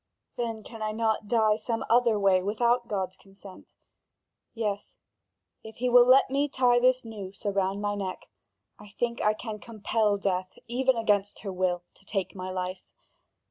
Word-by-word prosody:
Then 225 -2 -3
can 225 0 -10
I 215 0 -1
not 220 -1 0
die 220 -2 +3
some 225 +1 -3
other 235 -2 +4
way, 195 -2 +4
without 235 +5 +1
God's 190 -3 -3
consent? 195 -1 -15 0.8
Yes, 210 -3 -3 0.7
if 220 0 -10
he 250 +2 -1
will 245 0 +7
let 260 +1 +6
me 285 +2 +1
tie 250 -2 +3
this 255 0 +3
noose 200 -4 -9
around 200 0 0
my 205 0 -1
neck. 195 -2 -5 0.5
I 205 -1 -14
think 240 0 -1
I 210 0 +2
can 215 -1 -6
compel 215 -1 0
death, 185 -2 -2
even 255 +1 +1
against 205 -3 0
her 195 -3 -5
will, 180 -1 0
to - - -25
take 195 -2 -3
my 185 -1 -6
life. 185 0 -5
215 Hz, 165 wpm, -27 LUFS, 195-235 Hz, 0.8 s, will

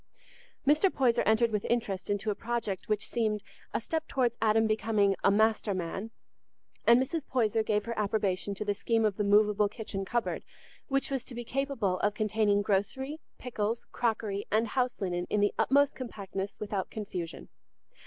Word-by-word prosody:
Mr. 300 +7 +5
Poyser 245 -3 +2
entered 220 +1 +4
with 210 -2 -1
interest 200 -6 -1
into 205 +1 0
a - - +1
project 225 -4 -3
which 215 -1 0
seemed 215 -3 0 0.3
a - - 0
step 320 +7 -3
towards 245 -3 +1
Adam's 220 0 +4
becoming 215 -2 +2
a - - +6
"master 215 0 +2
man," 185 +4 -4 0.8
and 235 +1 +8
Mrs. 285 +4 -2
Poyser 225 -3 +2
gave 210 -1 0
her 230 - -2
approbation 200 -2 0
to 210 - -4
the 205 - +1
scheme 225 +2 +1
of 205 -3 0
the 210 - +1
movable 210 0 +4
kitchen 205 -2 -5
cupboard, 235 +4 -1 0.4
which 275 -1 0
was 265 -3 -1
to 245 - -8
be 240 - -4
capable 245 -8 -1
of 205 0 +1
containing 210 -1 +2
grocery, 265 +10 -1 0.2
pickles, 225 -2 -2
crockery, 215 -4 -1
and 220 +1 +2
house 250 0 0
linen 175 -2 -1
in 210 - +1
the 205 0 +3
utmost 285 +1 +4
compactness 200 -5 -5
without 205 -3 -3
confusion. 185 -6 -6
215 Hz, 170 wpm, -30 LUFS, 200-240 Hz, 0.8 s, and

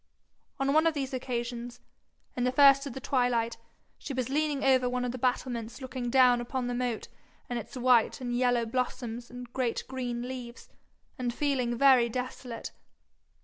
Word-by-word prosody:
On 275 +1 +1
one 315 +2 +5
of 325 - +1
these 270 -2 -3
occasions, 245 -1 -4 0.6
in 245 - -1
the 250 - +2
first 275 +1 +6
of 270 - -6
the 265 - -6
twilight, 245 -3 0 0.4
she 275 - -6
was 255 -1 -1
leaning 295 -1 0
over 260 -2 +4
one 250 0 -1
of 245 - -1
the 255 - -6
battlements 245 -1 -2
looking 255 -2 -4
down 250 -1 +5
upon 250 +1 -3
the 245 - -2
moat 245 -2 -2 0.4
and 245 -1 -2
its 235 - -9
white 245 -2 +3
and 245 -2 -3
yellow 245 -1 +2
blossoms 240 0 -3
and 245 0 -10
great 250 -3 -1
green 245 -2 -3
leaves, 250 -2 -8 0.5
and 245 -1 -1
feeling 250 -3 0
very 255 -3 +6
desolate. 250 -1 -5
250 Hz, 170 wpm, -29 LUFS, 240-260 Hz, 0.6 s, first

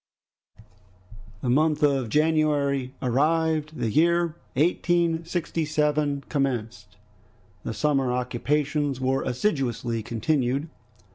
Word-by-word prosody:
The 125 - 0
month 150 +2 +2
of 135 -5 +2
January 145 -3 +1
arrived. 155 +4 +1
The 110 - -1
year 170 +3 +2 0.2
1867 160 -3 0
commenced. 125 -6 -3 0.7
The 115 - -4
summer 135 +2 +1
occupations 140 +3 -1
were 130 +1 0
assiduously 125 - -1
continued. 130 +5 -1
145 Hz, 80 wpm, -25 LUFS, 130-155 Hz, 0.7 s, month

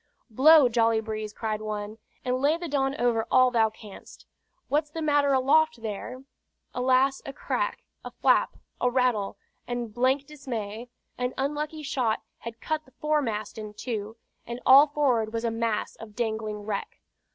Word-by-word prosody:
"Blow, 290 +4 +7
jolly 230 -1 +2
breeze," 215 -1 -5
cried 215 -1 -3
one, 215 0 -5 0.3
"and 250 0 +1
lay 295 +4 +3
the 345 0 -5
Don 275 -2 0
over 235 -2 +1
all 255 -1 +5
thou 225 -2 +3
canst. 215 -2 -14 0.4
What's 300 +1 0
the 325 - -6
matter 290 -2 +2
aloft 275 0 +3
there?" 230 +4 -6 0.5
Alas! 260 +2 +2
a - - -6
crack, - - -3 0.2
a - - -6
flap, - - +2 0.2
a 250 - +3
rattle; 245 -5 0 0.3
and 240 -3 -4
blank 260 +4 +1
dismay! 240 -6 -6 0.3
An 250 0 -2
unlucky 300 +3 -3
shot 250 -6 -1 0.2
had 230 0 -8
cut 310 +4 -3
the 260 -1 -23
foremast 240 -9 -1
in 210 -1 -8
two, 220 -2 -5 0.3
and 235 +1 -5
all 275 +3 +8
forward 255 -7 +1
was 230 0 -2
a 230 - 0
mass 225 -1 -2
of 215 -2 -11
dangling 220 -2 -3
wreck. 220 - -4
245 Hz, 160 wpm, -27 LUFS, 220-280 Hz, 0.5 s, all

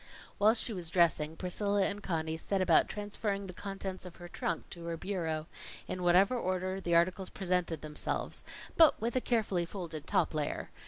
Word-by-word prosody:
While 215 +3 +6
she 230 0 -1
was 175 -4 -3
dressing, 160 -3 +3
Priscilla 200 +2 +1
and 200 +1 -2
Conny 160 -4 -2
set 195 +4 -1
about 180 -3 +5
transferring 205 -1 -2
the 185 - -7
contents 195 0 -5
of 180 -2 -9
her 175 - -10
trunk 170 -1 -3
to 170 -2 -6
her 170 -1 -3
bureau, 165 -5 -2 0.4
in 185 - -4
whatever 180 +6 +5
order 185 -3 -1
the 170 -2 +1
articles 185 +2 +2
presented 180 -5 -1
themselves 150 -1 -3 0.3
but 320 -3 +7
with 235 +3 -2
a 255 - +2
carefully 215 -8 +1
folded 165 -4 -6
top - - +2
layer. 150 -1 -2
185 Hz, 175 wpm, -32 LUFS, 170-200 Hz, 0.4 s, but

